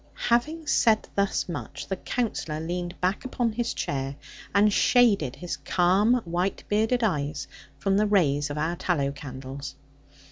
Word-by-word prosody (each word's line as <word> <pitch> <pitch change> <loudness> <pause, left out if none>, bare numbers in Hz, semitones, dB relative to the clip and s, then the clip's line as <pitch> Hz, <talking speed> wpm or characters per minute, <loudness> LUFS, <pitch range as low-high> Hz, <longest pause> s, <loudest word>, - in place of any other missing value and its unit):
Having 305 +7 +1
said 225 -7 +3
thus 200 -1 0
much, 145 -4 -6
the 190 - -1
Counsellor 190 -8 -2
leaned 175 +2 -4
back 185 +7 0
upon 245 -3 -1
his 235 +2 -2
chair, 135 0 -3 0.4
and 205 +1 +4
shaded 200 - +4
his 175 -1 -5
calm 205 +7 +2
white 175 +3 -1
bearded 220 +4 +1
eyes 150 -7 -1 0.3
from 195 +7 +1
the 210 +1 +3
rays 145 -8 +2
of 145 - -4
our 160 +3 0
tallow 170 -6 0
candles. 135 0 -8
180 Hz, 145 wpm, -26 LUFS, 150-215 Hz, 0.4 s, and